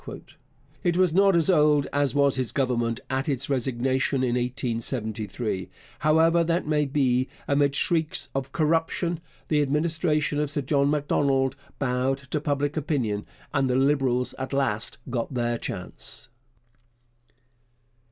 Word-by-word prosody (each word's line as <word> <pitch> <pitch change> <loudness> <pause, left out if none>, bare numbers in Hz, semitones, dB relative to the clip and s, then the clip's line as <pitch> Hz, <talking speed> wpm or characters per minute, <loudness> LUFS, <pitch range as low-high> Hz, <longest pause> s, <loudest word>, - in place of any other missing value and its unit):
It 175 -2 +1
was 180 -3 +3
not 195 0 +5
as 165 -2 +3
old 150 -5 +4
as 145 0 +1
was 140 -1 +3
his 130 -2 -1
Government 120 -3 0
at 135 +3 -1
its 140 +1 -1
resignation 130 +1 0
in 125 - +1
1873. 115 -4 -2 0.3
However 165 +2 +4
that 170 +2 0
may 150 -1 +1
be, 130 -2 +1 0.2
amid 140 0 +2
shrieks 165 +3 0
of 135 -1 -3
'corruption' 165 +1 0 0.3
the 150 -1 +2
Administration 150 +1 +1
of 150 -1 0
Sir 145 0 -1
John 140 +1 +2
Macdonald 140 -2 +1 0.2
bowed 130 0 0
to 150 - 0
public 145 0 -1
opinion, 130 -9 -1 0.3
and 135 -1 +1
the 125 - +1
Liberals 135 -2 +1
at 130 +1 -4
last 120 -6 0
got 125 +1 -3
their 120 -1 0
chance. 90 +5 -6
140 Hz, 135 wpm, -26 LUFS, 125-150 Hz, 0.3 s, not